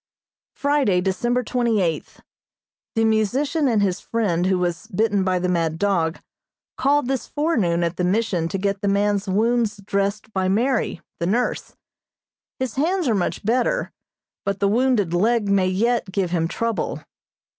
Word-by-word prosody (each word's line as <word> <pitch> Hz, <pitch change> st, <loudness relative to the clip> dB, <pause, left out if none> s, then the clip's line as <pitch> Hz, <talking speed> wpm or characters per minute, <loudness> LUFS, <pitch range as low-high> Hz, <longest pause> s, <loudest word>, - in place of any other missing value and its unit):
Friday, 280 Hz, -10 st, +2 dB
December 240 Hz, +7 st, 0 dB
twenty 235 Hz, -2 st, +1 dB
eighth: 165 Hz, -4 st, -2 dB, 0.7 s
The 225 Hz, 0 st, +2 dB
musician 265 Hz, +8 st, +1 dB
and 220 Hz, -5 st, +2 dB
his 185 Hz, -3 st, 0 dB
friend 185 Hz, -6 st, 0 dB
who 190 Hz, -1 st, +2 dB
was 175 Hz, 0 st, -2 dB
bitten 205 Hz, -1 st, +1 dB
by 185 Hz, -1 st, +1 dB
the 180 Hz, 0 st, -1 dB
mad 165 Hz, -3 st, 0 dB
dog 170 Hz, -4 st, +1 dB, 0.6 s
called 285 Hz, +2 st, +2 dB
this 265 Hz, -1 st, -2 dB
forenoon 215 Hz, -, 0 dB
at 170 Hz, +1 st, -2 dB
the 180 Hz, -, -1 dB
Mission 185 Hz, -3 st, +1 dB
to 195 Hz, -, -3 dB
get 200 Hz, 0 st, -1 dB
the 205 Hz, -, -1 dB
man's 200 Hz, 0 st, +1 dB
wounds 220 Hz, +2 st, +1 dB
dressed 200 Hz, +2 st, -2 dB
by 190 Hz, -1 st, 0 dB
Mary, 230 Hz, -2 st, 0 dB, 0.2 s
the 170 Hz, -, -1 dB
nurse. 240 Hz, +6 st, -1 dB, 0.8 s
His 260 Hz, -1 st, -4 dB
hands 345 Hz, +3 st, +1 dB
are 230 Hz, -, +3 dB
much 195 Hz, 0 st, -2 dB
better, 255 Hz, -, +1 dB, 0.5 s
but 200 Hz, -1 st, -1 dB
the 200 Hz, -, +2 dB
wounded 220 Hz, -5 st, +2 dB
leg 215 Hz, +4 st, +2 dB
may 195 Hz, -2 st, +3 dB
yet 215 Hz, +2 st, 0 dB
give 190 Hz, -3 st, -1 dB
him 165 Hz, -2 st, +1 dB
trouble. 230 Hz, +5 st, -2 dB
205 Hz, 155 wpm, -22 LUFS, 185-240 Hz, 0.8 s, are